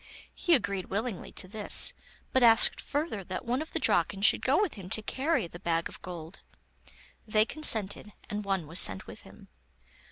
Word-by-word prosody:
He 345 -2 +2
agreed 200 -7 -3
willingly 210 0 -4
to 185 - -3
this, 210 +1 +3 0.4
but 260 - +3
asked 230 -1 +5
further 290 - -3
that 185 +6 -6
one 250 +4 -1
of 315 - -8
the - - -3
Draken 195 - +1
should - - +5
go 270 +6 +2
with 410 -6 0
him 190 -4 -10
to 220 - 0
carry 280 - -1
the 170 +1 -11
bag 165 -2 -1
of - - -12
gold. 175 0 -9 0.9
They 215 0 +2
consented, 215 -8 +1 0.2
and 210 0 -5
one 195 -4 -2
was 165 +4 +1
sent 95 -2 +3
with - - -11
him. - - -17
210 Hz, 185 wpm, -28 LUFS, 185-255 Hz, 0.9 s, asked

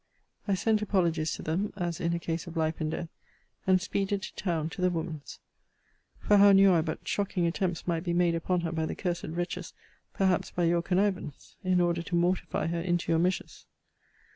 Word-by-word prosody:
I 200 - +2
sent 215 +2 +1
apologies 170 -6 +1
to - - -6
them, 185 +7 -1
as 175 -4 -3
in 170 - +1
a - - -2
case 165 +1 -3
of 170 0 -7
life 160 0 0
and 155 - 0
death; 165 +1 -4 0.6
and 185 0 +5
speeded 200 +1 -1
to - - -6
town 165 -5 -1
to - - -7
the 180 - +4
woman's: 160 -4 -5 0.8
for 205 - +3
how 200 0 +8
knew 195 -1 +7
I 165 - +4
but 160 - -5
shocking 195 -3 0
attempts 175 0 -1
might 170 -2 -1
be 175 - -1
made 175 -1 +3
upon 175 +2 0
her 165 -1 -2
by 160 -1 -1
the - - -4
cursed 175 -3 -2
wretches: 175 +2 -4 0.4
perhaps 190 -2 +1
by 175 - -2
your 170 0 +3
connivance, 185 -4 -1
in 185 -1 +2
order 170 -1 +1
to 175 +1 -3
mortify 175 +2 0
her 170 0 -1
into 175 -1 0
your 165 - +3
measures? 180 +2 -2
175 Hz, 200 wpm, -29 LUFS, 165-185 Hz, 0.8 s, how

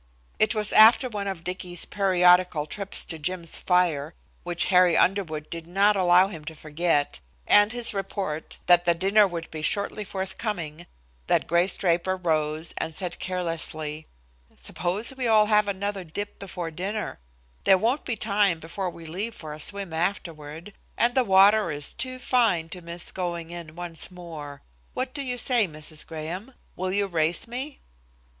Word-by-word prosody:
It 215 - +3
was 210 -1 0
after 225 +4 +7
one 205 -4 -4
of 190 -4 -4
Dicky's 180 -1 -3
periodical 180 -4 +3
trips 200 +6 -4
to 160 - -6
Jim's 170 +1 -2
fire, 170 -5 +1 0.3
which 175 -1 -2
Harry 180 -2 +6
Underwood 165 -6 +1
did 165 -1 -6
not 200 +4 +3
allow 180 0 +5
him 165 -6 -8
to 160 0 -7
forget, 155 - 0 0.3
and 205 +1 +5
his 240 -1 0
report 195 -5 -4
that 175 0 +5
the 170 -1 +4
dinner 200 +4 +4
would 170 -2 -6
be 155 - -6
shortly 200 +5 0
forthcoming, 190 -4 -4 0.4
that - - +2
Grace 175 +3 +2
Draper 175 +1 +1
rose 155 -2 -1
and 160 - -4
said 180 +1 -5
carelessly: 160 -4 -3 0.5
"Suppose 205 +9 -3
we 255 -2 -1
all 215 -1 +5
have 210 -1 +3
another 200 0 -2
dip 205 +5 -6
before 175 -4 -5
dinner; 195 - -4 0.5
there 190 - +6
won't 240 +9 0
be 240 - -2
time 200 -5 +1
before 180 +4 -4
we 170 -1 -11
leave 200 +8 -4
for 155 -2 -8
a 150 - -9
swim 195 +1 -1
afterward, 165 0 -4 0.2
and 240 +1 +3
the 260 - +3
water 200 -1 +5
is 145 -2 -2
too 255 0 -2
fine 225 -10 +2
to 180 - -6
miss 170 +1 -6
going 170 -2 -4
in 170 -2 -8
once 175 -2 -6
more. 160 -6 -9 0.3
What 255 0 -3
do 285 - -4
you 250 -2 -3
say, 240 -4 +2
Mrs. 155 -1 -6
Graham? 170 +10 -6 0.2
Will 185 +1 -2
you 200 +1 +1
race 165 -1 0
me?" 260 +5 -5
180 Hz, 165 wpm, -26 LUFS, 165-205 Hz, 0.5 s, after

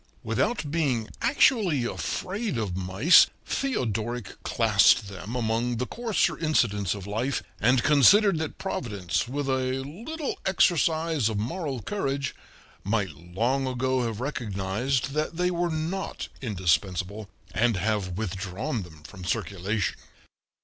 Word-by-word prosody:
Without 155 -12 -1
being 135 -9 0
actually 195 - +3
afraid 200 - -3
of 105 -6 -2
mice, 95 - +6 0.2
Theodoric 120 - -2
classed 100 - +4
them 100 +4 -7
among 120 0 0
the 125 - -1
coarser 220 - 0
incidents 105 - +1
of 100 -2 -8
life, 115 +6 -1 0.2
and 120 +3 +3
considered 170 +6 +6
that 160 -1 -4
Providence, 105 - -2
with 140 +2 -3
a 130 0 0
little 240 - -5
exercise 165 - +2
of 110 - -2
moral 130 - -3
courage, 140 - -2 0.5
might 100 -2 0
long 110 - -1
ago 130 0 0
have 115 -2 -4
recognized 120 0 -1
that 155 +2 -2
they 180 0 +1
were 175 0 0
not 165 +4 -3
indispensable, 95 -1 -1 0.2
and 115 +1 +2
have 100 -3 -1
withdrawn 100 - -3
them 80 -4 -12
from 95 +4 -11
circulation. 95 +2 -1
125 Hz, 120 wpm, -27 LUFS, 100-155 Hz, 0.5 s, mice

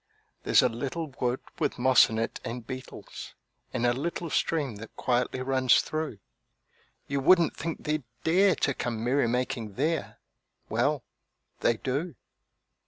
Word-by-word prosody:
There's - - +5
a - - +5
little 140 +6 -4
wood, 125 +1 0 0.2
with - - 0
moss 130 +1 +6
in 110 - -3
it 115 - -2
and 120 -1 -5
beetles, 130 +1 -8 0.4
And 120 - -1
a 120 - +4
little 165 +4 -3
stream 145 -9 0
that 110 +1 -11
quietly 125 +1 0
runs 130 -1 +4
through; 155 -7 -3 0.9
You 140 0 -1
wouldn't 170 +3 +5
think 165 +1 -4
they'd 155 0 0 0.2
dare 185 +4 +4
to 140 - +1
come 115 -3 -3
merrymaking 125 -3 0
there 155 +4 -1 0.5
Well, - - +1 0.6
they 115 - +2
do. 140 +7 -2
130 Hz, 140 wpm, -28 LUFS, 120-155 Hz, 0.9 s, moss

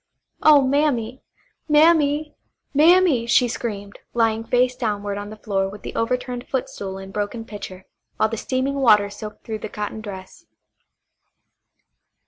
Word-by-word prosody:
"Oh, 295 -2 +7
Mammy! 260 -3 0 0.5
Mammy! 300 -1 +4 0.4
Mammy!" 315 -5 +4
she 245 +1 +4
screamed, 205 -4 -5 0.2
lying 225 -1 +1
face 250 +2 +1
downward 205 -4 -2
on 205 0 -7
the 215 - -10
floor 195 -3 -1
with 205 +1 -11
the - - -6
overturned 250 +1 -2
footstool 200 -7 -4
and 195 0 -10
broken 210 +2 -3
pitcher, 190 -3 -9 0.3
while 215 - +3
the 225 - -3
steaming 260 +4 -2
water 210 -5 +5
soaked 210 +1 -9
through 220 -1 -5
the - - -6
cotton 210 +1 -5
dress. 190 -3 -10
230 Hz, 135 wpm, -22 LUFS, 205-265 Hz, 0.5 s, Oh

